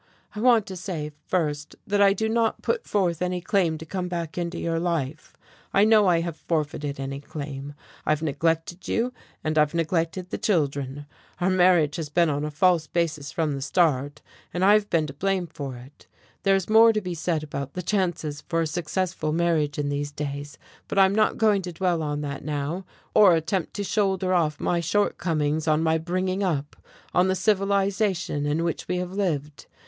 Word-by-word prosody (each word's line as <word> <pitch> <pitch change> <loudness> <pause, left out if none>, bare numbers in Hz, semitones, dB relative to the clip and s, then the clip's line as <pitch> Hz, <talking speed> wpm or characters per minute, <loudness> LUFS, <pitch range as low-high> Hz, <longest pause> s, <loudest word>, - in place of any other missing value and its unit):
I 210 - -6
want 235 -2 +4
to 190 - -7
say, 170 -5 -4 0.2
first, 150 -4 -1
that 205 0 +1
I 200 -1 +6
do 220 +3 -1
not 225 0 0
put 470 0 -1
forth 180 -5 0
any 180 0 0
claim 175 -3 +1
to 160 - -9
come 180 +2 -3
back 170 -3 -4
into 175 0 -3
your 165 -1 -1
life. 165 -4 -3 0.4
I 200 +1 +6
know 215 -2 +5
I 170 -2 +4
have 165 -2 -4
forfeited 145 -3 -2
any 135 0 -4
claim. 145 -1 -7 0.3
I've 155 +1 0
neglected 165 +4 -1
you, 245 +2 0 0.3
and 155 0 +1
I've 150 +2 +2
neglected 170 +2 -1
the - - -3
children. 145 -6 -1 0.3
Our 185 +1 +2
marriage 175 -5 +4
has 160 -3 -4
been 170 +1 +3
on 145 +1 -2
a 150 - -2
false 160 +1 +2
basis 155 -5 -1
from 160 -3 0
the 140 -1 -3
start, 145 -2 +1 0.3
and 180 +1 0
I've 205 +1 +5
been 160 -2 +2
to 140 - -7
blame 190 +4 0
for 140 -5 -6
it. 125 +4 -15 0.3
There 195 0 +4
is 190 -2 -1
more 225 +1 +7
to 215 - +1
be 180 -2 -4
said 165 -1 -1
about 140 -2 -5
the 180 - -4
chances 170 -6 -1
for 165 0 +1
a - - +1
successful 170 0 -2
marriage 160 -3 +1
in 145 -1 -1
these 145 0 -2
days, 145 0 -5 0.3
but - - -4
I'm 190 0 +6
not 215 +1 +2
going 210 -3 +3
to 180 -1 -6
dwell 175 -1 0
on 150 -1 -2
that 140 -2 -5
now, 150 +5 -3 0.3
or 195 -5 +7
attempt 170 +2 -2
to 205 - -2
shoulder 190 -2 +1
off 155 -4 +1
my 175 - +1
shortcomings 160 -4 0
on 155 +1 +3
my 160 0 +2
bringing 185 +3 -1
up, 150 -7 -1 0.4
on 180 +1 +4
the 190 - +1
civilization 195 -6 +1
in 155 +3 0
which 170 -1 -3
we 180 - -1
have 180 0 -3
lived. 155 -7 -2
170 Hz, 195 wpm, -25 LUFS, 150-190 Hz, 0.4 s, more